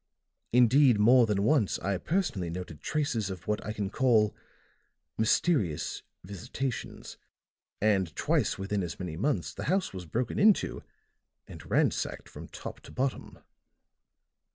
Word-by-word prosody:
Indeed, 125 +1 +5
more 120 +3 +6
than 100 -2 0
once 115 -3 +2
I 100 -2 -2
personally 155 - -1
noted 85 -3 -7
traces 135 - -1
of 90 -2 -8
what 105 0 -1
I 105 - -4
can 105 -2 -3
call 110 -5 +3 0.8
mysterious 110 - +1 0.2
visitations. 110 +6 -5 0.6
And 100 -5 +1
twice - - +1
within 100 +1 -2
as 85 -2 -5
many 90 -4 -5
months 90 - -1
the - - -6
house 185 - 0
was 90 -2 -7
broken 120 +8 -2
into 210 -1 +3 0.7
and - - -11
ransacked - - 0
from - - -10
top - - -8
to - - -14
bottom." 130 +1 -3
105 Hz, 130 wpm, -29 LUFS, 95-130 Hz, 0.8 s, more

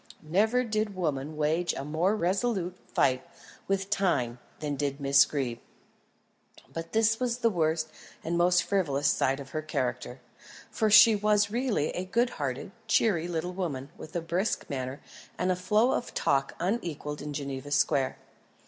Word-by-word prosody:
Never 215 +10 +2
did 215 -3 -1
woman 150 -4 -2
wage 160 +3 +1
a 135 - -5
more 165 +7 +1
resolute 190 -1 0 0.2
fight 130 0 +2 0.4
with 195 0 -1
Time 145 - +1 0.2
than 150 -2 -2
did 140 0 -2
Miss 140 0 +5
Greeb. 125 -5 -3 1.1
But 165 0 -6
this 225 0 +3
was 245 -2 0
the 230 -2 +2
worst 160 -3 0 0.4
and 170 +2 -1
most 175 +1 +4
frivolous 145 -8 0
side 135 +1 +1
of 135 -1 -9
her 155 - -2
character, 135 -4 -3 0.5
for 220 -2 +1
she 220 +1 +8
was 210 0 +2
really 235 - 0
a 180 - -3
good 235 +6 +1
hearted, 135 +5 -3 0.2
cheery 195 -6 +2
little 175 +1 -3
woman, 150 -7 -4
with 155 - -11
a 175 - 0
brisk 175 +6 -1
manner, 130 0 -4 0.4
and 180 +1 +1
a - - +1
flow 210 +7 +2
of 245 - -3
talk 135 -1 +1
unequalled 165 -7 -3
in 150 +1 -5
Geneva 140 -1 -5
Square. 140 -2 +1
170 Hz, 155 wpm, -28 LUFS, 145-205 Hz, 1.1 s, she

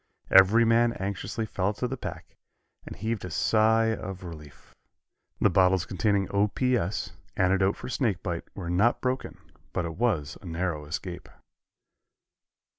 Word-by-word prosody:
Every 100 +5 +7
man 115 +1 +4
anxiously 100 +3 -3
felt 100 +2 -2
of 125 - 0
the - - -1
pack, 125 - -8 0.5
and - - -7
heaved 110 0 -3
a 90 - -5
sigh 110 +5 +3
of 95 -3 -6
relief. 75 -4 -11 0.7
The 105 - +3
bottles 90 0 +3
containing 100 +1 0
O. 100 +1 +3
P. 125 +4 +1
S., 100 -3 -2 0.3
antidote 95 +1 +2
for - - -7
snake 115 -8 -1
bite, 85 -4 -3
were 90 -4 -6
not 105 +7 +3
broken, 130 0 -2 0.4
but 90 - -1
it 80 - -4
was 100 -12 0
a - - -14
narrow 85 -2 -2
escape. 85 +4 -6
100 Hz, 150 wpm, -27 LUFS, 90-115 Hz, 0.7 s, Every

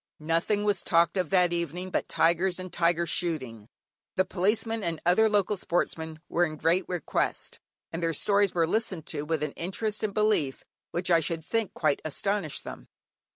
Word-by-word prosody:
Nothing 165 +7 0
was 205 -2 +1
talked 170 +1 +3
of 180 -5 0
that 180 -2 +4
evening 170 +2 -3
but - - -1
tigers 175 +2 +2
and 185 -1 -7
tiger 170 0 +2
shooting. 130 -11 -2 0.5
The 185 - +3
Policeman 210 +4 0
and 165 -3 -2
other 220 +6 +5
local 205 -1 +1
sportsmen 160 -3 -2
were 175 - +1
in 155 -3 -2
great 170 +5 +2
request, 175 -4 -2 0.3
and 165 - -4
their 165 -1 0
stories 200 +3 +2
were 165 -1 +3
listened 185 -3 -1
to - - -2
with 155 -1 -1
an 150 - -2
interest 210 +5 -3
and 215 - -1
belief 210 -10 +1 0.2
which 180 +1 -1
I 170 - +6
should 160 0 -2
think 225 0 -1
quite 155 -3 +1
astonished 170 +1 -2
them. - - -9
175 Hz, 175 wpm, -28 LUFS, 165-195 Hz, 0.5 s, I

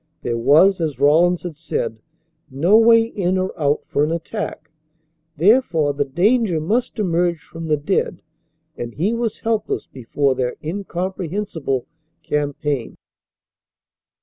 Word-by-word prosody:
There 120 - -1
was, 155 +11 +4
as 155 -4 -2
Rawlins 165 +5 +4
had 175 -3 -6
said, 120 -7 -3 0.5
no 160 +10 +3
way 230 0 +6
in 190 -5 -1
or 185 0 -1
out 145 -3 0
for 145 - 0
an 150 - 0
attack. 165 -2 -5 0.7
Therefore 165 - +3
the 145 0 -1
danger 185 - +2
must 225 +11 -1
emerge 175 -4 +1
from 165 0 -8
the 155 -1 +2
dead, 175 +3 -1 0.5
and 120 -1 -6
he 195 +9 0
was 230 -2 -2
helpless 225 -2 -1
before 135 +2 -1
their 125 -1 -2
incomprehensible 180 -4 -3 0.4
campaign. 145 -3 -2
165 Hz, 125 wpm, -20 LUFS, 145-195 Hz, 0.7 s, way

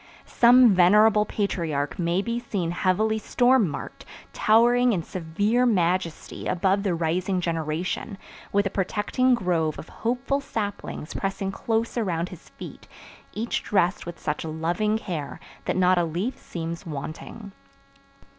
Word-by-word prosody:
Some 245 -2 +6
venerable 210 +4 +5
patriarch 165 -10 -2
may 175 +3 +1
be 235 +1 -2
seen 195 -8 -3
heavily 215 +5 +1
storm 245 -2 +3
marked, - - -7 0.3
towering 240 +2 +4
in 175 -4 -1
severe 205 +9 0
majesty 180 -5 -1
above 190 +2 +1
the 195 -4 0
rising 180 +3 0
generation, 170 +4 -3 0.3
with 200 0 +2
a 195 - -1
protecting 210 +7 +1
grove 170 -7 0
of - - -9
hopeful 255 +4 0
saplings 205 - -5
pressing 195 0 -2
close 225 +4 -1
around 175 -5 -1
his 180 -2 -13
feet, - - -11 0.5
each 230 +2 -2
dressed 190 -3 0
with 175 - -6
such 150 0 -3
loving 170 +7 -1
care 170 -9 -5 0.3
that - - -1
not 185 0 +4
a - - +2
leaf 175 +10 -2
seems 165 0 -6
wanting. 160 +8 -7
190 Hz, 135 wpm, -25 LUFS, 170-220 Hz, 0.5 s, Some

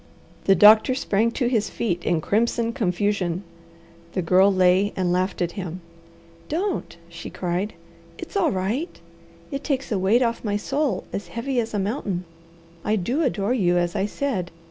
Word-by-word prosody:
The 195 - +5
doctor 215 +5 +7
sprang 225 -3 +1
to 255 - -1
his 225 -4 +1
feet 175 -7 -2
in 165 -2 +1
crimson 230 +4 +1
confusion. 190 -4 0 0.7
The 185 - -1
Girl 185 +4 +5
lay 185 +2 +3
and 180 -2 0
laughed 185 0 0
at 170 - -2
him. 180 -1 -6 0.7
"Don't!" 360 - -2
she 170 0 -8
cried. 180 +3 -3 0.4
"It's - - -9
all 350 -7 +3
right! 215 - -2 0.5
It 275 0 -4
takes 275 -3 -2
a 205 - +1
weight 210 +7 +3
off 235 -1 -1
my 205 -2 0
soul 280 +6 -1
as 200 - -4
heavy 245 +2 -2
as 225 -2 -2
a - - +1
mountain. 195 -3 -2 0.6
I 215 - +1
do 235 - 0
adore 205 - 0
you, 180 -7 +2
as 175 +1 0
I 195 0 +1
said. 210 -8 -2
205 Hz, 165 wpm, -24 LUFS, 185-240 Hz, 0.7 s, doctor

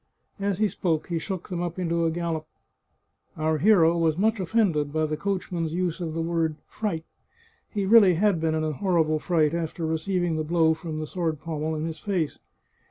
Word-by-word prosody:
As 200 -2 0
he 215 +1 +3
spoke 165 -5 -1
he 170 -1 0
shook 185 +1 -5
them 175 -2 -3
up 175 0 -3
into 170 -2 0
a - - +3
gallop. 165 -2 -3 0.9
Our 155 0 0
hero 170 -3 +5
was 165 -2 +1
much 220 +2 +2
offended 175 -7 +1
by 155 +1 +1
the 155 0 -2
coachman's 175 -3 -2
use 180 -1 -1
of 165 -2 -3
the 165 0 -1
word 165 -2 0
fright. 175 -7 -3 0.6
He 205 -3 -2
really 200 -3 +7
had 190 -2 +2
been 160 -1 +1
in 155 - 0
a 155 - 0
horrible 160 -1 +1
fright 160 -2 +2
after 165 0 -3
receiving 165 +1 0
the 155 - -1
blow 160 0 +3
from 160 -1 -6
the 155 - -3
sword 160 -2 -2
pommel 160 0 -3
in 155 +1 -2
his 165 -1 -5
face. 180 -6 -2
165 Hz, 195 wpm, -26 LUFS, 160-185 Hz, 0.9 s, really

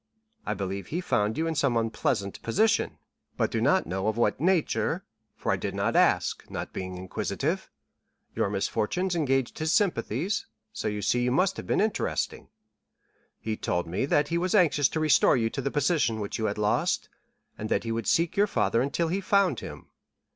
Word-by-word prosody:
I 105 - 0
believe 95 0 -4
he 170 - -2
found 105 - 0
you 160 - 0
in 165 - 0
some 140 -5 +1
unpleasant 110 -3 -1
position, 215 - +1 0.4
but - - +1
do - - -1
not - - +3
know 95 +4 -2
of 110 +1 0
what 120 - +1
nature, 180 -1 +1 0.3
for - - -2
I - - +1
did - - -4
not - - 0
ask, - - +3
not - - -5
being 95 -1 -5
inquisitive. 90 0 -3 0.6
Your - - 0
misfortunes 115 - -1
engaged 135 -5 0
his 155 0 0
sympathies, 200 -1 0 0.3
so - - -3
you 105 -1 -2
see 125 - +2
you 125 - +1
must 185 +8 +2
have - - -7
been - - +1
interesting. 215 0 -1 0.9
He 110 -1 -3
told 90 -4 -1
me 90 +10 -2
that 145 0 +2
he 170 0 +1
was 185 +3 0
anxious 150 -8 +4
to 160 - -2
restore 155 -4 +4
you 115 -1 0
to - - -3
the 140 - -1
position 145 -6 +1
which 105 +2 -4
you 110 - 0
had 105 -1 -1
lost, 105 0 +1 0.5
and 110 - -5
that - - +1
he 115 - -3
would 115 -3 -2
seek 170 +2 +2
your 205 +1 +4
father 115 - +1
until 155 +5 0
he 190 +4 -1
found 195 - +2
him. - - -9
135 Hz, 190 wpm, -27 LUFS, 105-170 Hz, 0.9 s, anxious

